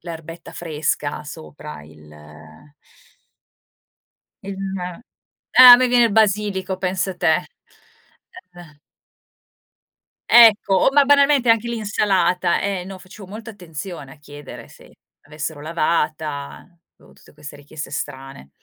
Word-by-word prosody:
l'erbetta 165 0 -10
fresca 150 -2 -4
sopra, 150 - -11
il 75 0 -17 2.4
il 200 -1 -7 0.2
ma 180 -1 -6 0.6
ah, 255 -1 +11
a - - +8
me 255 0 +1
viene 240 -1 +4
il - - -6
basilico, 200 -3 0
pensa 185 0 -3
te, 175 -2 +2 1.2
eh. 155 -4 -15 1.5
Ecco! 220 -4 +6
O - - +3
ma 285 0 +5
banalmente 280 -3 +3
anche 230 +1 +2
l'insalata, 195 -6 0
e 195 -2 -3
no, 195 0 -9
facevo 185 +1 -14
molta 220 +3 -9
attenzione 165 -6 -9
a - - -21
chiedere 145 -1 -12
se - - -18 0.3
l'avessero 150 +1 -7
lavata, 155 -2 -3 0.3
avevo - - -21
tutte - - -21
queste 150 0 -12
richieste 145 +1 -9
strane. 135 - -8
180 Hz, 115 wpm, -20 LUFS, 150-205 Hz, 2.4 s, ah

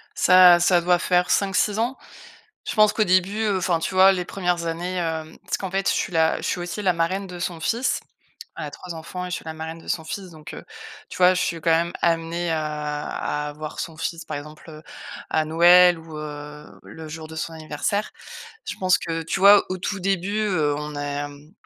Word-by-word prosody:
Ça 180 -1 +7
ça 175 0 +4
doit 175 0 +3
faire 180 -1 +1
5-6 200 +2 +1
ans. 245 +4 -1 0.7
Je - - -2
pense 215 -1 +5
qu'au 215 - +1
début, 185 +4 +2
heu 205 -3 +1
enfin, 175 -2 +1
tu 175 - -4
vois, 190 +1 +7
les 180 -2 -2
premières 175 -3 -2
années, 175 +3 -3
hem 160 -2 -3
parce - - -2
qu'en 190 -2 -5
fait 195 +1 -1
je - - +2
suis - - -2
la 160 -1 +3
je - - -10
suis 180 - -1
aussi 175 +4 -5
la 185 -2 +3
marraine 185 +4 -1
de 180 -1 -9
son 175 -2 -4
fils, 235 +8 0 0.6
elle - - -5
a - - -6
3 180 -2 -9
enfants 175 +3 -6
et - - -7
je - - -2
suis - - -10
la 160 0 -6
marraine 160 +1 -7
de - - -16
son 165 -3 -2
fils, 185 +2 -6
donc, 155 -2 -11
heu, - - -10 0.4
tu - - -9
vois, 180 0 +6
je 180 - 0
suis 170 - -1
quand 165 - +1
même 170 +1 +2
amenée 165 0 0
à 150 -1 -3 0.5
à - - -7
voir 155 0 -7
son 160 -2 -6
fils, 165 +1 -4
par 155 - -5
exemple, 150 +2 -10
heu, 155 0 -11 0.5
à 155 0 +1
Noël 175 +2 +6
ou, 160 -1 -11
heu, 150 0 -8 0.2
le 160 -1 -10
jour 160 0 -8
de 160 - -10
son 165 +1 -4
anniversaire. 160 +6 -3 0.5
Je - - -5
pense 185 -1 +3
que, 165 -1 -4
tu 185 +4 -3
vois, 200 +1 +8
au 185 - -1
tout 195 +2 -3
début, 195 +2 -1
heu, 160 -9 +1
on 150 0 -6
a, 145 - -3 0.2
hem, 145 +3 -14
170 Hz, 225 wpm, -23 LUFS, 160-185 Hz, 0.7 s, vois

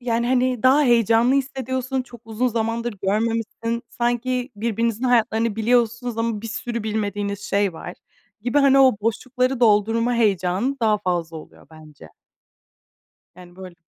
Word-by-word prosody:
yani 235 -1 -1
hani 255 -1 +1
daha 265 +3 +5
heyecanlı 235 0 +3
hissediyorsun, 260 -1 -2
çok 245 -2 -14
uzun 225 +3 -1
zamandır 230 0 -2
görmemişsin. 230 +3 -2
Sanki 245 +1 -2
birbirinizin 230 +2 -1
hayatlarını 230 -2 +1
biliyorsunuz 235 +1 0
ama 230 -2 -1
bir - - -5
sürü 235 +1 -4
bilmediğiniz 205 -2 -3
şey 200 -2 0
var 175 +2 -8 0.5
gibi. 245 +4 +1
Hani 275 -1 +5
o 260 -5 +5
boşlukları 250 +3 -1
doldurma 225 +2 +2
heyecanı 205 +3 0
daha 215 -2 +2
fazla 175 -4 -3
oluyor 155 - -13
bence. 155 - -15 1.3
Yani, 180 0 -15
böyle, 185 -2 -10
230 Hz, 135 wpm, -22 LUFS, 210-245 Hz, 1.3 s, daha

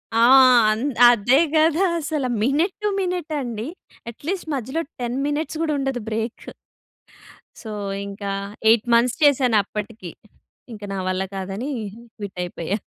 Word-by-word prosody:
ఆ! - - +3 0.5
అన్ 215 +3 -2 0.3
అదే 240 +3 +4 0.2
కదా! 320 +4 +3
అసలు 300 -4 -2
మినట్ 295 - +1
టు 420 - +2
మినట్ 360 -4 -3
అండి. 235 -2 -5 0.4
అట్లీస్ట్ 330 - -5
మధ్యలో 265 +5 -3 0.2
10 240 +1 -2
మినిట్స్ 305 +2 -3
కూడా 310 -2 0
ఉండదు 270 -3 -2
బ్రేకు. 225 +1 -4 1.1
సో, 220 - -8 0.4
ఇంకా 200 0 -5 0.4
8 225 -1 +4
మంత్స్ 235 +1 +3
చేశానప్పటికి. 220 - +1 0.6
ఇంకా 210 -1 -8
నా - - -3
వల్ల 185 +1 -1
కాదని 195 +7 -4 0.5
క్విట్ 200 -3 -8
అయిపోయా. 175 +2 -3
240 Hz, 125 wpm, -22 LUFS, 210-295 Hz, 1.1 s, అదే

